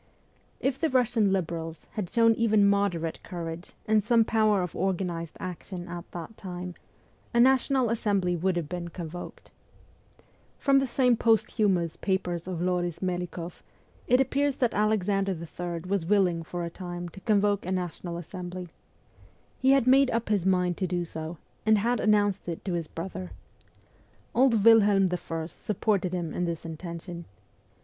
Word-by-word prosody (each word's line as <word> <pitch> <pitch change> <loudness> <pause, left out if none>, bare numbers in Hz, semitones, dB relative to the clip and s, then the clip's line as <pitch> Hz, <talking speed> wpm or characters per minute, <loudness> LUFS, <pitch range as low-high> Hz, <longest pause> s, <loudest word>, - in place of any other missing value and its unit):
If 270 0 -1
the 320 - +1
Russian 240 -5 +2
Liberals 165 -3 -3
had 205 -6 -4
shown 230 +1 +4
even 215 -3 +3
moderate 195 -5 0
courage 170 0 -6
and 215 -1 +3
some 230 +1 +4
power 215 -4 +3
of 180 - -5
organized 175 -3 -2
action 180 0 -6
at 175 0 -8
that 175 +6 -7
time, 180 -1 -6 0.6
a - - +4
National 265 0 +4
Assembly 200 -6 +1
would 180 +2 0
have 170 -4 -2
been 175 +1 -4
con 170 0 -6
voked. 175 +1 -9 1.1
From 275 -1 +4
the 270 - 0
same 250 0 +3
posthumous 205 -7 +2
papers 180 -3 -1
of 175 -2 -3
Loris 180 -1 -1
Melikoff, 180 -1 -4 0.5
it 250 +1 +5
appears 275 +1 +1
that 245 -3 +1
Alexander 200 -2 +1
III. 170 +1 -5
was 190 -4 -1
willing 185 -4 +3
for 175 +2 -5
a 170 - -5
time 175 -1 -6
to 180 - -12
convoke 205 0 +2
a 185 - -4
National 175 -1 -3
Assembly. 180 +1 -7 0.9
He 260 - +3
had 270 -3 +5
made 265 +1 +5
up 230 -2 -1
his 200 -4 +1
mind 180 -2 +2
to 185 - -1
do 175 -1 -1
so, 160 +1 -6 0.3
and 220 0 +4
had 235 +3 +1
announced 205 -3 +2
it 165 - -6
to 185 - -1
his 170 -2 -2
brother. 185 +3 -6 1.0
Old 235 -5 +3
Wilhelm 205 -4 +6 0.2
I. 165 -1 -2
supported 200 0 -1
him 175 -3 -3
in 180 - -1
this 170 -1 -4
intention. 170 +1 -7
185 Hz, 155 wpm, -28 LUFS, 175-215 Hz, 1.1 s, Wilhelm